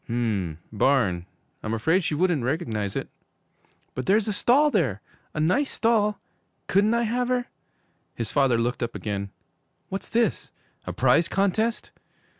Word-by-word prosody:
'M 105 Hz, -9 st, -1 dB
m, -, -, -27 dB
barn? 100 Hz, -7 st, +2 dB, 0.3 s
I'm 110 Hz, +1 st, -2 dB
afraid 160 Hz, -, +2 dB
she 150 Hz, -, -1 dB
wouldn't 170 Hz, -4 st, +1 dB
recognize 115 Hz, -, -2 dB
it.' -, -, -3 dB, 0.9 s
'But 130 Hz, -, -5 dB
there's 210 Hz, +2 st, +3 dB
a 210 Hz, -, 0 dB
stall 285 Hz, +8 st, +4 dB
there! 140 Hz, -, +1 dB, 0.4 s
A -, -, -2 dB
nice 220 Hz, -, +2 dB
stall! 215 Hz, -2 st, +1 dB, 0.5 s
Couldn't 205 Hz, +4 st, +3 dB
I 235 Hz, -, +2 dB
have 245 Hz, +2 st, 0 dB
her?' 250 Hz, -1 st, 0 dB, 0.7 s
His -, -, -4 dB
father 135 Hz, -4 st, +3 dB
looked 120 Hz, +3 st, -1 dB
up 120 Hz, -1 st, -3 dB
again. 100 Hz, -1 st, -3 dB, 0.6 s
'What's 195 Hz, +1 st, -5 dB
this? 235 Hz, 0 st, 0 dB, 0.4 s
A -, -, -2 dB
prize 170 Hz, 0 st, +3 dB
contest? 210 Hz, +4 st, 0 dB
160 Hz, 150 wpm, -25 LUFS, -, 0.9 s, stall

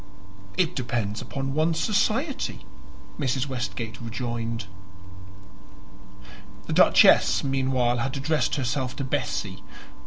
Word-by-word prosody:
"It 180 Hz, -2 st, +1 dB
depends 120 Hz, -5 st, -2 dB
upon 135 Hz, 0 st, -4 dB
one's 160 Hz, +2 st, +1 dB
society," 230 Hz, -, 0 dB, 0.5 s
Mrs. 130 Hz, -2 st, 0 dB
Westgate 120 Hz, -3 st, -4 dB
rejoined. 115 Hz, -1 st, -4 dB, 2.0 s
The -, -, -3 dB
Duchess -, -, +6 dB
meanwhile 130 Hz, -3 st, +1 dB
had 130 Hz, +4 st, -2 dB
addressed 150 Hz, +3 st, 0 dB
herself 130 Hz, -1 st, -2 dB
to 140 Hz, -, -3 dB
Bessie. 130 Hz, -, -2 dB
130 Hz, 95 wpm, -25 LUFS, 120-145 Hz, 2.0 s, Duchess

